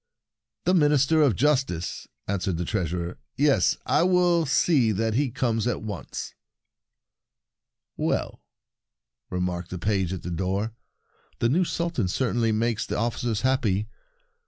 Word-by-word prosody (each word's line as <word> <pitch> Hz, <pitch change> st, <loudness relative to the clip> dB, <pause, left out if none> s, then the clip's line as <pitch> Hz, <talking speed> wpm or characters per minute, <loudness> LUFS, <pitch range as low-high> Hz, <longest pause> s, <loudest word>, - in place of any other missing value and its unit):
"The 180 Hz, -, +2 dB
Minister 150 Hz, -2 st, +4 dB
of 135 Hz, -9 st, +4 dB
Justice," 130 Hz, -, 0 dB, 0.2 s
answered 95 Hz, -3 st, -1 dB
the 90 Hz, -, -2 dB
Treasurer; 90 Hz, -3 st, -2 dB
" -, -, -52 dB
yes, 140 Hz, -, +3 dB
I -, -, +3 dB
will 175 Hz, -2 st, +3 dB
see 135 Hz, -5 st, +3 dB
that 110 Hz, +2 st, 0 dB
he 135 Hz, +3 st, +1 dB
comes 115 Hz, -2 st, 0 dB
at 120 Hz, -, -2 dB
once." 105 Hz, -5 st, -6 dB, 1.6 s
"Well," -, -, -1 dB, 0.9 s
remarked 90 Hz, -1 st, -2 dB
the 90 Hz, -, -5 dB
page 95 Hz, 0 st, 0 dB
at 95 Hz, -, -5 dB
the 90 Hz, -, -4 dB
door, 95 Hz, +5 st, -1 dB, 0.6 s
"the 115 Hz, -, +1 dB
new 175 Hz, +8 st, +3 dB
Sultan 170 Hz, -, -1 dB
certainly 120 Hz, +2 st, 0 dB
makes 110 Hz, 0 st, 0 dB
the -, -, -2 dB
officers 115 Hz, -1 st, -1 dB
happy 110 Hz, -6 st, +1 dB
115 Hz, 135 wpm, -26 LUFS, 95-140 Hz, 1.6 s, Minister